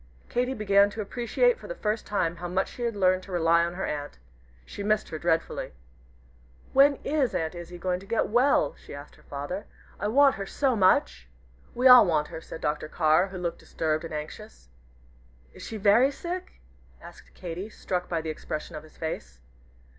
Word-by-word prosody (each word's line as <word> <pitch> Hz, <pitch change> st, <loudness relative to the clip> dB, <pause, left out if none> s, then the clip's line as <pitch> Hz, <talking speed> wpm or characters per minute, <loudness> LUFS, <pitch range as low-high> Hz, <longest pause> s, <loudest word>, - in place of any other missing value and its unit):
Katy 250 Hz, +2 st, -1 dB
began 200 Hz, -2 st, +4 dB
to 215 Hz, +1 st, -5 dB
appreciate 250 Hz, -, +1 dB
for -, -, -11 dB
the -, -, -5 dB
first 215 Hz, -, -2 dB
time 175 Hz, -5 st, -1 dB
how 175 Hz, +1 st, -5 dB
much 185 Hz, +2 st, -1 dB
she -, -, -11 dB
had 235 Hz, -2 st, -1 dB
learned 185 Hz, -1 st, +3 dB
to 190 Hz, -, -12 dB
rely 170 Hz, -1 st, +3 dB
on 170 Hz, +1 st, -3 dB
her 190 Hz, -, -3 dB
aunt. 145 Hz, -1 st, -5 dB, 0.5 s
She -, -, -8 dB
missed 215 Hz, +1 st, 0 dB
her 155 Hz, -, -5 dB
dreadfully. 165 Hz, -, -1 dB, 1.0 s
"When 280 Hz, +1 st, +6 dB
is 280 Hz, -4 st, 0 dB
Aunt 160 Hz, 0 st, -1 dB
Izzie 175 Hz, 0 st, -9 dB
going 180 Hz, 0 st, -1 dB
to 195 Hz, -, -14 dB
get 230 Hz, +1 st, +1 dB
well?" 240 Hz, -, +3 dB
she -, -, -9 dB
asked 145 Hz, +1 st, -11 dB
her -, -, -20 dB
father; 145 Hz, +8 st, -6 dB, 0.3 s
"I -, -, -1 dB
want 275 Hz, +5 st, +5 dB
her 195 Hz, 0 st, -5 dB
so 265 Hz, +1 st, +1 dB
much." 65 Hz, -, +2 dB, 0.5 s
"We 250 Hz, +2 st, +4 dB
all 250 Hz, -5 st, +9 dB
want 150 Hz, -3 st, +1 dB
her," 160 Hz, -, -7 dB
said 160 Hz, -, -9 dB
Dr. 150 Hz, +1 st, -2 dB
Carr, 155 Hz, +3 st, +3 dB
who 190 Hz, -1 st, -8 dB
looked 175 Hz, -1 st, -3 dB
disturbed 155 Hz, 0 st, -2 dB
and 165 Hz, -, -7 dB
anxious. 110 Hz, -, -8 dB, 0.8 s
"Is -, -, -13 dB
she 225 Hz, -, -6 dB
very 215 Hz, +6 st, +5 dB
sick?" 355 Hz, +5 st, -6 dB, 0.5 s
asked -, -, -15 dB
Katy, 180 Hz, +3 st, -6 dB
struck 180 Hz, -4 st, -4 dB
by 165 Hz, -2 st, -1 dB
the 160 Hz, 0 st, -3 dB
expression 155 Hz, +1 st, -6 dB
of 155 Hz, -, -6 dB
his 155 Hz, 0 st, -18 dB
face. 65 Hz, -, -5 dB
185 Hz, 190 wpm, -27 LUFS, 160-225 Hz, 1.0 s, all